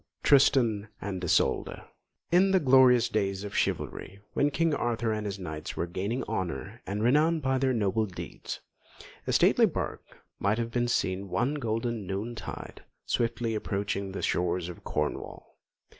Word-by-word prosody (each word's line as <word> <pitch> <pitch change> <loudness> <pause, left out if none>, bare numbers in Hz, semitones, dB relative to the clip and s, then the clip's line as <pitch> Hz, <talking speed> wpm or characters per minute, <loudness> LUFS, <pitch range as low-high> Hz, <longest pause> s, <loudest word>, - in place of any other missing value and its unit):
TRISTAN 120 -6 +4
AND 95 -2 -4
ISOLDA 90 - +1 0.4
In 185 +3 +5
the 190 -1 +4
glorious 130 -4 +6
days 100 -2 -1
of 100 -1 -6
chivalry, 100 - -2
when 145 - +2
King 165 +2 +1
Arthur 120 -4 0
and 105 -1 -3
his 100 -1 -4
knights 80 -5 -6
were - - 0
gaining 100 +9 -2
honour 95 - -4
and 105 +2 -2
renown 155 +7 +4
by 130 -2 0
their 135 0 +2
noble 110 -2 +1
deeds, 95 - -7 0.7
a - - +1
stately - - +5
barque - - -6 0.2
might 100 +2 +1
have 115 0 -2
been 120 0 +1
seen 95 -4 -1
one 95 +10 0
golden 115 -5 -2
noon 100 +5 -3
tide 115 - -8 0.2
swiftly 115 -1 0
approaching 100 -2 -2
the 95 - -5
shores 90 0 0
of 90 - -10
Cornwall. 75 0 -4
110 Hz, 155 wpm, -28 LUFS, 95-125 Hz, 0.7 s, glorious